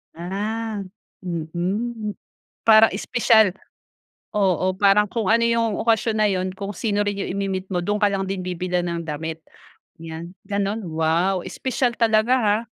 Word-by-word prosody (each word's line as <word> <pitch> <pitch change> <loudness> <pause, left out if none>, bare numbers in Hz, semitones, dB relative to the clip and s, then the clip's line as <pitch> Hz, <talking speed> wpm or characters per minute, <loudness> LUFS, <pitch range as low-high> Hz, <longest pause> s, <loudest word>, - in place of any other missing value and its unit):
Ah, 205 +5 -3 0.4
mm. 190 +7 -3 0.5
Para 220 0 +7
espesyal 220 -1 +3 0.8
oo 185 -2 +2
parang 205 +1 +4
kung 225 -5 -2
ano 230 +1 +4
yung 230 -1 +1
okasyon 225 -1 +2
na 215 - +4
yun, 185 -1 -1
kung 200 +1 -5
sino 205 +1 0
rin 205 - -1
yung - - -3
imi-meet 190 -1 -2
mo, 180 - +1
dun 205 +4 0
ka 205 - +5
lang 195 -1 -1
din 195 -1 -2
bibilhan 180 0 -1
ng 170 -1 -3
damit, 160 +2 -4 0.6
yan 165 +2 -8
ganun? 200 +1 -1
Wow, 165 +4 +1
espesyal 245 +6 -1
talaga, 225 +2 +3
ha. 210 -3 +3
200 Hz, 145 wpm, -22 LUFS, 180-220 Hz, 0.8 s, Para